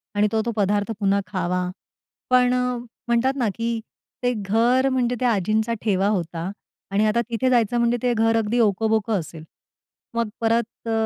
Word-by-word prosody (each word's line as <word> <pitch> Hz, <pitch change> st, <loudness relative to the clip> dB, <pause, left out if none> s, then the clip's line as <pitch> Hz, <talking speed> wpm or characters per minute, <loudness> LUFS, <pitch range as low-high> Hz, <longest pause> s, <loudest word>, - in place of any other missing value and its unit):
आणि 205 Hz, +1 st, +3 dB
तो-तो 225 Hz, +1 st, 0 dB
पदार्थ 205 Hz, +1 st, +1 dB
पुन्हा 200 Hz, -1 st, +2 dB
खावा. 180 Hz, -1 st, -1 dB, 0.6 s
पण 250 Hz, 0 st, +4 dB, 0.5 s
म्हणतात 240 Hz, +3 st, +2 dB
ना, 245 Hz, -4 st, +1 dB
की 230 Hz, 0 st, -2 dB, 0.4 s
ते 245 Hz, 0 st, +2 dB
घर 230 Hz, +5 st, +2 dB
म्हणजे 250 Hz, -2 st, 0 dB
त्या 250 Hz, -1 st, +2 dB
आजींचा 215 Hz, +4 st, 0 dB
ठेवा 195 Hz, -3 st, +1 dB
होता 175 Hz, -3 st, -2 dB, 0.4 s
आणि 205 Hz, +2 st, +2 dB
आता 215 Hz, +2 st, +2 dB
तिथे 240 Hz, +2 st, 0 dB
जायचं 240 Hz, -2 st, +2 dB
म्हणजे 235 Hz, 0 st, +2 dB
ते 245 Hz, -1 st, +2 dB
घर 225 Hz, 0 st, +2 dB
अगदी 225 Hz, +2 st, 0 dB
ओकबोक 220 Hz, 0 st, +2 dB
असेल. 165 Hz, -5 st, -3 dB, 0.7 s
मग 230 Hz, -1 st, -1 dB
परत 230 Hz, 0 st, -1 dB
अ, -, -, 0 dB
225 Hz, 155 wpm, -23 LUFS, 200-235 Hz, 0.7 s, पण